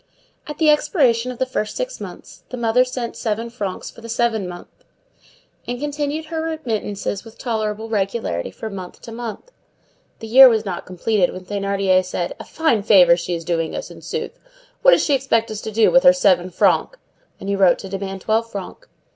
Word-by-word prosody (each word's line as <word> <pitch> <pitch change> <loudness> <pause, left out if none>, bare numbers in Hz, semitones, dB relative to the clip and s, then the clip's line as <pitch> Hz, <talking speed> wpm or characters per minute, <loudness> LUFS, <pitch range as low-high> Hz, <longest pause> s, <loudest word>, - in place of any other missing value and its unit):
At 300 -1 -6
the 310 -2 +5
expiration 255 - +2
of 250 - -9
the 260 - 0
first 255 -4 -3
six - - -4
months - - -10
the 250 - -6
mother 240 +1 +3
sent 250 -2 -5
seven 230 +1 -3
francs 205 -6 -5
for - - -15
the 230 - -9
seventh 230 -5 0
month, 175 0 -12 0.8
and 245 0 -3
continued 295 +2 -3
her 320 0 -4
remittances 225 -11 -3
with 225 -1 -14
tolerable 220 -2 -3
regularity 195 - -2
from 205 - -7
month 185 -2 -8
to 230 - -9
month. 235 - -7 0.7
The 225 - -9
year 255 +4 +9
was 220 -2 0
not 180 -3 -5
completed 185 +1 0
when 185 0 -9
Thénardier 195 -2 +1
said: 180 -1 -3
"A - - -6
fine 315 -10 +1
favor 185 -5 +6
she 175 0 -3
is 165 -1 -7
doing 165 -2 -1
us, - - -6
in - - -12
sooth! - - -5 0.4
What - - +7
does - - +3
she 290 - +2
expect 235 -4 +1
us 215 0 -5
to 220 - -5
do 220 +1 +4
with 265 - +6
her 270 - +7
seven 185 -9 +2
francs?" - - +1 0.4
and 195 - -8
he 200 - 0
wrote 190 -2 +4
to - - -8
demand 195 0 -5
twelve 225 +2 0
francs. 200 - -8
220 Hz, 195 wpm, -20 LUFS, 195-255 Hz, 0.8 s, year